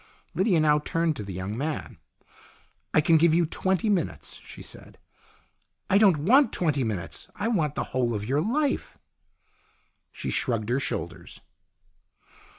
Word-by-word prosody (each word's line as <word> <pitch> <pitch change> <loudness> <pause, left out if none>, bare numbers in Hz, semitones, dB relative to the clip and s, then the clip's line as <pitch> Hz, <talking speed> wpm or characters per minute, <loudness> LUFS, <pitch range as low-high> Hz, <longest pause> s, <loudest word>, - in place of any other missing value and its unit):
Lydia 185 -3 +2
now 150 -1 +4
turned 165 +1 0
to 130 - -6
the 100 - -7
young 95 +3 -4
man. 150 +5 -4 0.5
" - - -33
I 155 - +6
can 160 +2 +5
give 160 0 +4
you 170 0 +3
twenty 190 +6 0
minutes," 200 -4 -2
she - - -11
said. - - -10 0.5
" - - -45
I 200 - +6
don't 195 -7 +5
want 230 - +4
twenty 150 -6 +1
minutes. 105 -6 -4
I 205 - -2
want 155 -10 0
the - - -1
whole 120 -3 +1
of 105 0 -3
your 135 +6 +1
life." 275 - -1 1.1
She - - -5
shrugged 115 -4 -1
her 125 +3 +2
shoulders. - - -5
155 Hz, 155 wpm, -26 LUFS, 130-190 Hz, 1.1 s, I